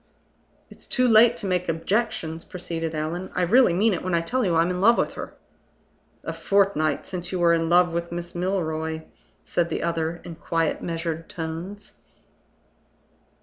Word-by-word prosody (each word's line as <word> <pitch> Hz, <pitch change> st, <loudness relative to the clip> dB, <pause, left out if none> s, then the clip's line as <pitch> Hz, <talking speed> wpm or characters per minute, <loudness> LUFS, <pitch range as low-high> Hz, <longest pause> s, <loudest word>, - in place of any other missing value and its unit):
"It's -, -, -13 dB
too 255 Hz, -1 st, +2 dB
late 235 Hz, +1 st, +6 dB
to 205 Hz, -, -4 dB
make 180 Hz, -2 st, 0 dB
objections," 165 Hz, -1 st, -1 dB
proceeded 165 Hz, -3 st, -4 dB
Allan. 165 Hz, +4 st, -3 dB
"I 180 Hz, -, +1 dB
really 235 Hz, +5 st, +5 dB
mean 205 Hz, +5 st, +3 dB
it 175 Hz, -, -2 dB
when 185 Hz, -1 st, 0 dB
I 170 Hz, -, +2 dB
tell 250 Hz, +10 st, -1 dB
you 180 Hz, -5 st, +1 dB
I'm 165 Hz, +2 st, +3 dB
in 180 Hz, 0 st, -3 dB
love 230 Hz, +4 st, +6 dB
with -, -, 0 dB
her." -, -, -8 dB, 0.9 s
"A -, -, -4 dB
fortnight 190 Hz, -7 st, +1 dB
since 180 Hz, -2 st, -5 dB
you 185 Hz, -, -1 dB
were 170 Hz, -1 st, +4 dB
in 165 Hz, -1 st, +1 dB
love 175 Hz, 0 st, +4 dB
with 170 Hz, 0 st, -3 dB
Miss 175 Hz, 0 st, -5 dB
Milroy," 160 Hz, -3 st, -2 dB, 0.4 s
said 170 Hz, -1 st, 0 dB
the -, -, -2 dB
other, 165 Hz, 0 st, -1 dB
in 170 Hz, -, -8 dB
quiet, 165 Hz, -1 st, -1 dB
measured 165 Hz, -1 st, -4 dB
tones. 170 Hz, +5 st, -6 dB
175 Hz, 170 wpm, -24 LUFS, 165-190 Hz, 0.9 s, late